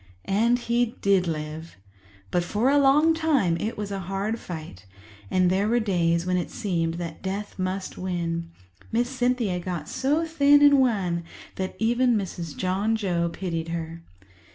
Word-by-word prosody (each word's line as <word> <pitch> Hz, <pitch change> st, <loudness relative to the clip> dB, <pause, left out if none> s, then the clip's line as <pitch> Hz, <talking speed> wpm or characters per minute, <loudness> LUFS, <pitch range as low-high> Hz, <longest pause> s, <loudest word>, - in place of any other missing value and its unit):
And 230 Hz, +5 st, +2 dB
he 240 Hz, 0 st, 0 dB
did 195 Hz, -3 st, +3 dB
live; 155 Hz, +1 st, -5 dB, 0.5 s
but 175 Hz, -, +1 dB
for 215 Hz, +9 st, +1 dB
a 290 Hz, -, +5 dB
long 295 Hz, +4 st, +5 dB
time 295 Hz, -, +2 dB
it 220 Hz, +5 st, -3 dB
was 205 Hz, -1 st, -4 dB
a 195 Hz, -, -3 dB
hard 205 Hz, +4 st, -2 dB
fight, 155 Hz, -, -8 dB, 0.4 s
and 180 Hz, +4 st, +3 dB
there 195 Hz, +2 st, +1 dB
were 240 Hz, +2 st, +3 dB
days 170 Hz, -5 st, +1 dB
when 180 Hz, 0 st, +1 dB
it 175 Hz, -, -2 dB
seemed 170 Hz, -6 st, -1 dB
that 170 Hz, -2 st, -6 dB
death 200 Hz, +1 st, -5 dB
must 185 Hz, +1 st, -3 dB
win. 170 Hz, -2 st, -2 dB, 0.4 s
Miss 240 Hz, +2 st, +1 dB
Cynthia 245 Hz, -7 st, 0 dB
got 175 Hz, -4 st, -4 dB
so 285 Hz, +5 st, 0 dB
thin 290 Hz, -3 st, +5 dB
and 285 Hz, -1 st, +7 dB
wan 190 Hz, -9 st, +1 dB, 0.3 s
that 190 Hz, 0 st, -4 dB
even 240 Hz, +2 st, +2 dB
Mrs. 175 Hz, -6 st, -5 dB
John 195 Hz, +4 st, 0 dB
Joe 175 Hz, -6 st, 0 dB
pitied 165 Hz, -2 st, -4 dB
her. 165 Hz, 0 st, -5 dB
195 Hz, 160 wpm, -25 LUFS, 170-240 Hz, 0.5 s, and